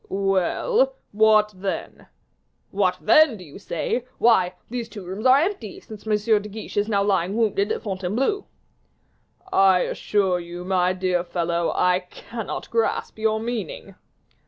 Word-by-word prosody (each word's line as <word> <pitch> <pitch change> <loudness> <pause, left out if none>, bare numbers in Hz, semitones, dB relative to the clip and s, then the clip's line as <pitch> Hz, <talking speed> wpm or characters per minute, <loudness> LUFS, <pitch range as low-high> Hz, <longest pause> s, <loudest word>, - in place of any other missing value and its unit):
"Well; 200 - +1 0.2
what 215 0 +4
then?" 190 +1 -5 0.6
"'What 190 -2 +1
then,' 290 0 +5
do 185 - -11
you 150 +2 -12
say? 200 +5 -2
Why, 185 -6 +3
these 235 -1 -5
two 205 -3 -9
rooms 195 +7 -2
are 260 +1 +7
empty, 300 - -2
since 220 -1 -12
M. 210 0 +2
de 210 - -8
Guiche 215 +2 -8
is 205 +1 +2
now 200 -2 +2
lying 195 0 0
wounded 210 -3 +1
at - - -3
Fontainebleau." 210 - -1 1.1
"I 190 -2 +5
assure 190 -4 0
you, 175 +1 -8
my 185 -1 +2
dear 185 -1 0
fellow, 170 -1 -1
I 180 0 +3
cannot 230 -2 -7
grasp 230 -1 -1
your 220 0 +1
meaning." 220 -4 -5
205 Hz, 145 wpm, -23 LUFS, 185-225 Hz, 1.1 s, are